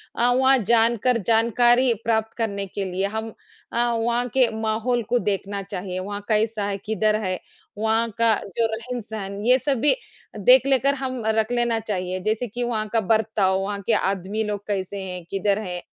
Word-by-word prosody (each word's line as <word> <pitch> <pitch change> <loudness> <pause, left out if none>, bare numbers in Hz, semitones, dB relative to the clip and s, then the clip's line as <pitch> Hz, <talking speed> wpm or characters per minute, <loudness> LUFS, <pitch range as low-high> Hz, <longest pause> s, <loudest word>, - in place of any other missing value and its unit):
अ, 235 - +2
वहाँ 265 +1 +4
जानकर 235 +2 +2
जानकारी 240 +2 +4
प्राप्त 220 -1 0
करने 200 -4 -2
के 195 +1 -4
लिए 190 +2 -1
हम 220 0 -3 0.4
अ, - - -2
वहाँ 235 +1 0
के 255 -3 +4
माहौल 225 +2 0
को 245 - +3
देखना 200 0 -2
चाहिए। 185 -1 -5
वहाँ 205 +2 -5
कैसा 215 -1 +1
है, 200 -1 -2
किधर 215 +1 0
है, 185 -1 -2 0.4
वहाँ 220 +2 +1
का 230 -1 +4 0.2
जो 230 -1 +3
रहन-सहन 220 -4 -6
ये 250 +2 +6
सब 270 -1 0
भी 295 - +4 0.4
देख - - +6
लेकर 275 +1 +3
हम 260 -2 -4
रख 220 +1 +1
लेना 240 -2 +1
चाहिए। 185 -4 -3
जैसे 225 +3 -1
कि 240 +3 -4
वहाँ 220 -3 -1
का 230 - +4
वर्ताव, 215 -3 +1
वहाँ 200 +1 -3
के 230 - +3
आदमी 200 +1 -1
लोग 205 -1 -4
कैसे 200 -1 -3
हैं, 180 -2 -6
किधर 200 +1 +1
हैं। 180 -4 -5
220 Hz, 175 wpm, -23 LUFS, 200-235 Hz, 0.4 s, ये